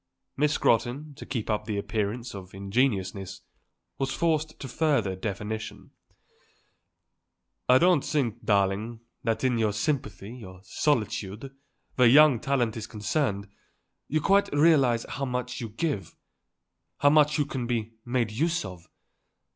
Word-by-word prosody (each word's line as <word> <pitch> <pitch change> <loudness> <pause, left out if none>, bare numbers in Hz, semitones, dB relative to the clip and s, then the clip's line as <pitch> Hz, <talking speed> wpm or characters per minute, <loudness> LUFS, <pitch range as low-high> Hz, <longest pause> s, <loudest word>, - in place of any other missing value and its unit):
Miss 150 +1 +2
Scrotton, 125 +7 +1
to 140 - -11
keep 120 -5 -3
up 105 -1 -1
the 105 -2 -3
appearance 105 +4 -3
of 95 -1 -9
ingenuousness, 95 -3 -1 0.6
was 135 -1 0
forced 155 -1 0
to 135 - -6
further 130 -11 +1
definition. 105 +3 -5 1.8
"I 125 - +8
don't 175 -2 +4
think, 120 -6 -1
darling, 105 +3 0 0.2
that 115 +1 -1
in 125 -3 +2
your 110 -2 +2
sympathy, 105 -3 -3
your 95 -5 -11
solicitude, 110 -1 -2 0.4
where 125 -2 +6
young 145 0 +7
talent 125 -4 0
is 110 -1 -5
concerned, 105 -1 -1 0.6
you 155 +1 0
quite 200 +5 +3
realize 145 -6 +4
how 135 +4 -3
much 125 0 -3
you 115 - -4
give, 110 - -3 0.8
how 145 0 +4
much 150 0 +4
you 145 - +2
can 130 -4 -4
be 115 -2 -2
made 120 -3 -1
use 165 +5 0
of. 90 -3 -10
120 Hz, 135 wpm, -27 LUFS, 105-140 Hz, 1.8 s, I